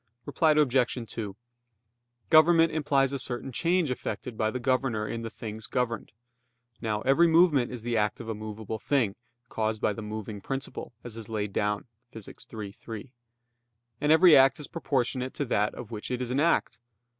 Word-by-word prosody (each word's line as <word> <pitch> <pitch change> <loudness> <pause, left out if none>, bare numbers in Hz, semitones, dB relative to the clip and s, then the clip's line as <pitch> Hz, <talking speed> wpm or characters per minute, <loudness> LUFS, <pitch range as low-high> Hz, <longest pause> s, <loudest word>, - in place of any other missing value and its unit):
Reply 155 +3 +2
Obj. 135 -5 +2 0.2
2: 105 -4 -5 1.0
Government 165 +1 +6
implies 140 -3 +1
a 140 - -2
certain 130 +1 -3
change 170 +2 +1
effected 125 -1 -4
by 110 0 0
the 125 - -3
governor 125 -3 0
in 115 - -4
the 115 - -5
things 110 0 -7
governed. 120 -3 -2 0.7
Now 105 -2 -1
every 140 +8 +4
movement 160 -6 +4
is 120 -3 -7
the 120 -1 -1
act 105 -1 0
of 115 - -8
a 115 - -2
movable 110 0 -6
thing, 120 -6 +1 0.4
caused 110 -1 -1
by 105 - +1
the 110 - -7
moving 105 -1 -6
principle, 135 +1 -5
as 115 -2 -7
is 115 -2 -9
laid 105 -2 -3
down 105 0 -1 0.3
Phys. 110 -3 -10 0.2
iii, 105 -3 -6
3. 115 +4 -9 0.9
And 150 - +3
every 165 +1 +8
act 135 +1 +5
is 150 - -5
proportionate 130 -5 -2
to 145 - -1
that 105 -4 0
of 120 -2 -9
which 105 -2 -6
it 125 - -2
is 125 -1 -3
an 130 - +1
act. 170 +3 +1
120 Hz, 180 wpm, -28 LUFS, 110-140 Hz, 1.0 s, every